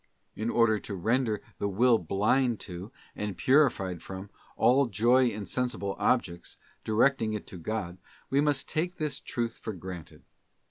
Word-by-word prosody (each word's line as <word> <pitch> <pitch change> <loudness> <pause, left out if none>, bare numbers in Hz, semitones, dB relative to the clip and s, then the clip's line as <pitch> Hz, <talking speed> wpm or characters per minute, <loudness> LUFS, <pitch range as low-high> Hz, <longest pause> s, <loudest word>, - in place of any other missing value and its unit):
In 110 +2 -2
order 115 -3 +3
to 100 - -6
render 110 +3 0 0.2
the 100 - 0
will 115 +4 +4
blind 110 +7 +1
to, 90 +2 -8 0.2
and 105 -3 -4
purified 100 - +3
from, 95 +1 -8 0.3
all 130 +2 +4
joy 120 +5 +4
in 105 -3 -3
sensible 120 -6 -2
objects, 85 -9 0 0.3
directing 110 0 +2
it 105 - -4
to 90 - -9
God, 95 -1 -4 0.3
we 140 +1 +2
must 145 -2 +1
take 175 +4 -1
this 150 -2 -2
truth 115 -1 -3
for 110 - -5
granted. 90 -3 -9
110 Hz, 150 wpm, -29 LUFS, 95-125 Hz, 0.3 s, will